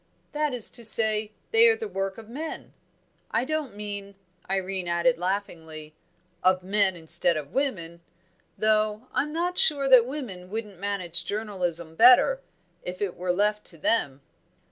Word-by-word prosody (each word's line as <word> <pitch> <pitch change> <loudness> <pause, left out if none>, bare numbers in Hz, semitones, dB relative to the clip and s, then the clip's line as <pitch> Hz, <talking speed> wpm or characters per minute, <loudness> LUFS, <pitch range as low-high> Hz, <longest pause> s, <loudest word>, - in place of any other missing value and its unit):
"That 300 0 -1
is 245 -3 +3
to 235 - -11
say, 215 -1 +4 0.2
they 455 +1 +6
are 450 - +4
the 445 -1 -6
work 195 - -4
of 225 -1 -11
men 300 +8 -7 0.6
I 230 +3 0
don't 300 -7 -3
mean," 205 -1 -6 0.3
Irene 190 -1 -2
added 170 +8 +1
laughingly, 160 -5 -5 0.5
"of 185 0 +2
men 195 0 +1
instead 170 0 +1
of 145 -2 -7
women. 170 -12 -3 0.6
Though 215 +2 0
I'm 300 - -1
not 350 +4 -2
sure 295 - +3
that 250 -2 +7
women 220 -11 -7
wouldn't 210 -3 -6
manage 185 -3 0
journalism 180 -6 -3
better, 250 - +6 0.4
if 180 +1 -7
it 200 -3 -3
were 180 0 -2
left 210 +3 +1
to 165 - -10
them." 145 -7 0
205 Hz, 150 wpm, -26 LUFS, 180-250 Hz, 0.6 s, that